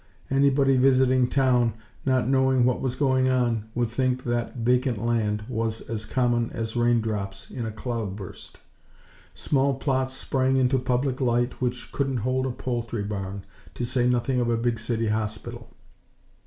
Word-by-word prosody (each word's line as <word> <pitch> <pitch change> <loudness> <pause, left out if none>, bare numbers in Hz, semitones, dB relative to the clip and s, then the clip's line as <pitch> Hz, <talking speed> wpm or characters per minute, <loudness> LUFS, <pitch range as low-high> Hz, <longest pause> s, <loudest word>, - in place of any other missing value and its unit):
Anybody 135 0 +4
visiting 130 -1 +4
town, 125 -4 +2 0.3
not 130 -2 +2
knowing 130 -1 +3
what 125 0 +1
was 130 -1 -1
going 130 -2 +2
on, 120 -4 +1
would 120 -2 0
think 130 +1 0
that 120 -1 -2
vacant 125 0 +1
land 105 -1 0
was 115 -2 -2
as 110 -1 -5
common 120 -2 +1
as 115 0 -4
raindrops 110 -5 0
in 120 -3 -4
a - - -4
cloudburst. 105 -4 -6 0.8
Small 140 -1 +1
plots 130 -1 -1
sprang 130 0 +1
into 130 0 +3
public 125 +1 -1
light 120 0 0
which 125 0 -2
couldn't 135 -2 -1
hold 130 +1 +1
a - - -1
poultry 120 -3 -3
barn, 100 -1 -5 0.3
to 120 - -2
say 125 0 +1
nothing 125 +1 +1
of 120 - 0
a 115 - +2
big 115 -1 0
City 115 0 -1
Hospital. 110 0 -4
120 Hz, 155 wpm, -25 LUFS, 115-130 Hz, 0.8 s, Anybody